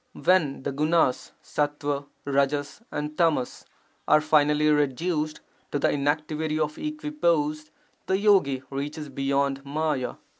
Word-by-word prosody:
[When 155 -8 +2
the - - -2
gunas 155 -1 +1
— - - -39
sattva, 145 -1 -2 0.2
rajas, 140 +4 0
and 150 +1 -4
tamas 160 -7 0 0.2
— - - -40
are 155 - +6
finally 150 0 +3
reduced 150 +2 0 0.3
to - - 0
the 140 - +2
inactivity 150 +2 -1
of 155 0 -2
equipoise, 170 - -1 0.4
the 190 - +2
yogi 190 -11 +3
reaches 145 +2 -4
beyond 140 0 0
may 150 0 -1
a. - - -7
150 Hz, 135 wpm, -26 LUFS, 140-155 Hz, 0.4 s, are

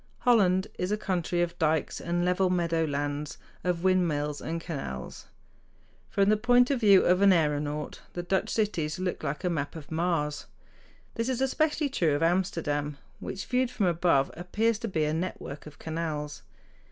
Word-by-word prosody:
Holland 190 -7 +4
is 180 +2 -1
a 210 - +1
country 175 -3 0
of 175 0 -5
dikes 160 -1 0
and 175 +1 0
level 180 +1 +2
meadow 170 -2 +1
lands, 145 0 -3 0.3
of 180 -1 -1
windmills 155 -6 +1
and 165 +1 -3
canals. 135 - -6 0.8
From 200 0 +2
the 215 - +4
point 245 +3 +4
of 270 - +1
view 200 -4 +6
of 180 +2 +4
an 200 - +7
aëronaut 150 -3 0
the 175 - -4
Dutch 190 +2 0
cities 170 -9 -1
look 185 -1 -3
like 150 +6 -3
a 180 - +1
map 145 -3 -3
of 155 -2 -10
Mars. 160 -3 -1 0.7
This 230 +2 -2
is 255 -2 -1
especially 300 +3 +1
true 165 - +1
of 145 - 0
Amsterdam, 160 -5 0 0.2
which, 195 - -5
viewed 250 0 +1
from 210 -5 -1
above, 170 -5 +2
appears 210 +6 0
to 230 - -3
be 160 -7 0
a 150 - 0
network 160 -4 -4
of 150 - -12
canals. 155 -2 -4
175 Hz, 170 wpm, -28 LUFS, 150-195 Hz, 0.8 s, an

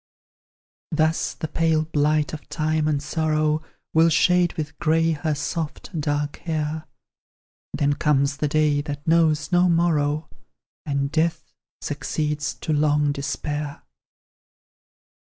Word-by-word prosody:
Thus 160 +1 +1
the 160 - -4
pale 160 0 +1
blight 150 -1 +1
of 155 - -8
time 155 -1 0
and 145 -2 0
sorrow 155 0 +1 0.3
Will 165 +1 +5
shade 175 +2 +3
with 150 -2 -5
grey 165 0 +2
her 155 0 -1
soft, 150 +4 -4
dark 145 0 -1
hair; 155 -1 -3 0.9
Then 145 0 +1
comes 140 -1 +1
the 150 - 0
day 150 -1 +2
that 145 0 -6
knows 160 -2 +3
no 180 0 +4
morrow, 155 -3 +1 0.6
And 140 -1 -1
death 160 +1 -1 0.3
succeeds 150 +1 -2
to 155 - -1
long 150 -1 +2
despair. 145 +1 -4
155 Hz, 115 wpm, -23 LUFS, 145-160 Hz, 0.9 s, Will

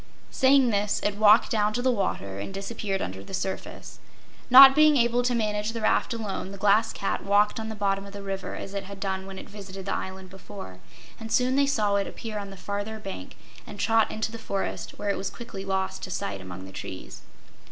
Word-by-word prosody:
Saying 265 -2 +4
this, 205 0 0
it 205 -1 0
walked 215 +1 +6
down 210 -1 +1
to 245 - -1
the 260 - +3
water 100 - -2
and 100 - -5
disappeared 195 0 -3
under 95 +1 -6
the 190 - -5
surface. 190 0 -5 0.5
Not 270 +1 +11
being 305 0 +5
able 240 0 +3
to 245 0 0
manage 210 -1 -1
the 230 - -4
raft 215 - +2
alone, 210 -4 -4
the 200 - -8
Glass 210 +3 +3
Cat 195 - -3
walked 205 +2 +3
on 220 0 -5
the 220 - -5
bottom 200 -1 -1
of - - -10
the 200 0 -8
river 195 -1 -4
as 195 - -7
it 200 -1 -4
had 200 0 -9
done 190 -1 -3
when 195 0 -8
it - - -9
visited 195 -2 -9
the 195 - -1
island 190 0 -6
before, 190 - -10 0.4
and 225 -1 -8
soon 255 +1 +2
they 280 0 +3
saw 210 -7 +1
it 200 - -1
appear 215 -2 -6
on 200 -1 -6
the 195 - -10
farther 205 +3 -4
bank 195 - -8 0.3
and 205 - -10
trot 225 +1 +3
into 220 0 -3
the 230 - -7
forest, 195 -3 -4
where 205 -1 -1
it - - -2
was 195 - -3
quickly 235 -5 -8
lost 190 -1 -2
to - - -6
sight 100 - -4
among 95 0 -8
the 95 - -11
trees. 95 0 -8
200 Hz, 225 wpm, -26 LUFS, 195-225 Hz, 0.5 s, Not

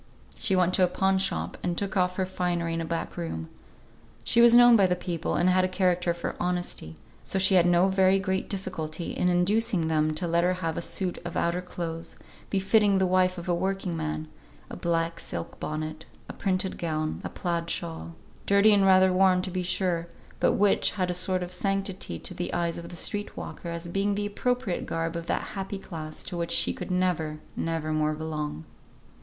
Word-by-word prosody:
She 190 - +2
went 180 -1 +3
to 185 - +4
a - - +5
pawn 190 +1 +1
shop, 195 - -2
and 175 -1 -2
took 200 0 -2
off 180 -1 +2
her 190 - 0
finery 175 -2 -1
in 165 - -2
a - - -3
back 165 0 -4
room. 80 -1 -4 0.7
She 235 - +3
was 235 0 +8
known 240 0 +8
by 195 -4 +5
the 180 - +1
people, 175 -2 -3
and 175 - +2
had 185 0 +4
a - - +3
character 180 -2 +1
for 170 0 -4
honesty, 175 - -3 0.3
so 135 +10 -2
she 190 +1 +4
had 175 -2 +5
no 175 +2 +4
very 190 0 +4
great 190 0 -2
difficulty 175 -4 -4
in 180 - +1
inducing 180 0 +2
them 155 -1 +1
to 175 +3 -1
let 170 +1 +2
her 180 +1 +3
have 165 -3 -3
a - - -2
suit 180 +1 -1
of 175 -1 -5
outer 170 +1 0
clothes, 165 -2 -6 0.3
befitting 200 +1 +3
the 190 - +3
wife 185 0 +2
of 175 - -7
a 175 - +2
working 190 0 -1
man, 155 -1 -3 0.4
a - - -5
black 165 -1 -1
silk 85 -1 -6
bonnet, 155 +1 -5 0.2
a - - -7
printed 190 -1 -1
gown, 155 -2 -2
a - - -4
plaid 170 -2 -3
shawl, 80 - -4 0.3
dirty 200 +2 +6
and 200 -1 +4
rather 185 0 +6
worn 185 -1 +4
to 185 - -3
be 185 0 -1
sure, 175 -2 0 0.3
but - - +3
which 205 0 +3
had 185 -3 -1
a - - -1
sort 185 0 0
of 180 0 -5
sanctity 195 - -2
to - - -4
the 90 - -4
eyes 170 -1 -1
of 170 - -9
the - - -8
street 205 +4 -3
walker 170 - -6
as 170 0 -5
being 195 +3 0
the 205 0 -1
appropriate 215 -1 -1
garb 165 0 -2
of 170 0 -5
that - - -1
happy 195 0 -4
class 155 -5 -7
to 180 - -6
which 170 -1 -2
she - - +3
could - - -7
never, 180 -4 0 0.2
never 160 -1 -2
more 155 0 +1
belong. 150 - -4
180 Hz, 205 wpm, -27 LUFS, 165-190 Hz, 0.7 s, was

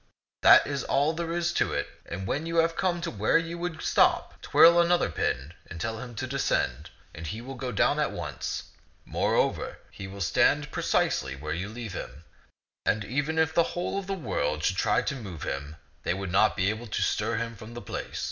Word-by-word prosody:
That - - +8
is 140 -1 -2
all 145 +3 +2
there 165 0 -3
is 175 0 0
to - - +1
it. - - -1 0.2
And 95 +3 -5
when 150 +11 -2
you 165 - -3
have 165 0 +3
come 175 -2 0
to 170 - -3
where 105 +6 +3
you 165 +1 -3
would 175 -2 -4
stop, - - +2
twirl 170 +1 +7
another 175 +1 +2
pin 65 +6 -2 0.2
and 80 - -7
tell 110 +3 -3
him 120 -1 -8
to 125 +5 -3
descend, 125 - -1 0.2
and 80 -1 -7
he 110 +8 -4
will 130 +3 -7
go 130 -1 -4
down 105 - +2
at - - +2
once. - - -4 0.4
Moreover, - - 0
he 95 - -8
will 100 +1 -9
stand 85 - +2
pre - - -3
cisely 65 0 +1
where 75 +1 -3
you 90 +5 -3
leave 115 -3 -6
him; 75 -3 -7 0.6
and 105 -1 +1
even 145 +7 -1
if 160 0 +2
the 170 +1 +1
whole 185 +3 -1
world 105 - -2
should 95 - +1
try 105 -2 +2
to 140 - -2
move 95 - -7
him, 70 +3 -4 0.3
they 85 - 0
would 95 -2 -4
not 105 +3 +4
be 95 +1 +2
able 110 +3 -6
to 105 - -2
stir 110 +2 0
him 115 +1 -3
from 110 +3 -11
the - - -4
place. - - -6
115 Hz, 210 wpm, -28 LUFS, -, 0.6 s, That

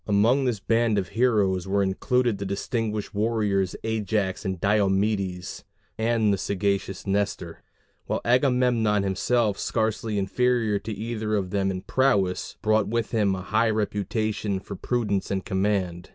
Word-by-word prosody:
Among 115 +7 +3
this 120 -5 0
band 115 +2 +1
of 95 -3 -1
heroes 100 -5 +1
were 100 +1 +2
included 120 +3 0
the 100 - -3
distinguished 105 +1 -3
warriors 105 -3 0
Ajax 105 -3 -1
and 95 -3 -3
Diomedes, 100 -2 0 0.3
and 110 -2 +2
the 100 - -1
sagacious 100 -1 -1
Nestor; 100 -4 -2 0.5
while - - -1
Agamemnon 125 -4 +2
himself, 105 +2 +1
scarcely 110 -1 -1
inferior 110 +1 +1
to 110 - -6
either 110 0 -3
of 95 -3 -2
them 100 -1 +1
in 95 -1 -4
prowess, 100 -9 +1
brought 110 0 +2
with 115 +1 -1
him 105 -4 +2
a 95 - -6
high 110 +3 +2
reputation 105 -1 -1
for 100 +1 -8
prudence 105 -2 -1
in 95 -1 -1
command. 95 -3 -1
105 Hz, 140 wpm, -25 LUFS, 95-115 Hz, 0.5 s, Among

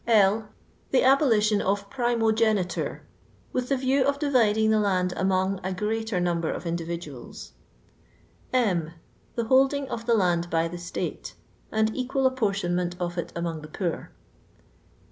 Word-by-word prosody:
L. 215 -1 +4 0.4
The 265 - +3
abolition 230 -6 +4
qf 200 +1 0
m 240 -2 +1
iniogeniture; 220 -5 +1 0.5
with 250 -1 -2
the 275 - +2
view 260 +1 +2
of 280 +1 +1
dividing 220 -7 +3
the 215 - +3
land 185 -3 +1
among 190 0 +1
a 190 0 -2
greater 220 0 -1
namber 170 -2 0
of - - -7
individuals. 165 - -6 1.0
H. 230 -8 +2 0.6
Tilt 235 -2 -2
holding 270 +2 +3
of 230 -1 -5
the 235 - +4
land 175 -4 +1
hg 165 0 0
the 175 - -6
Slate, 175 +1 -5 0.4
and 220 0 +1
equal 265 +1 -1
apportionment 195 -8 0
of 175 -1 -3
it 170 0 -4
among 170 -2 -3
the 155 - -9
poor. 170 +2 -3
210 Hz, 145 wpm, -26 LUFS, 175-240 Hz, 1.0 s, L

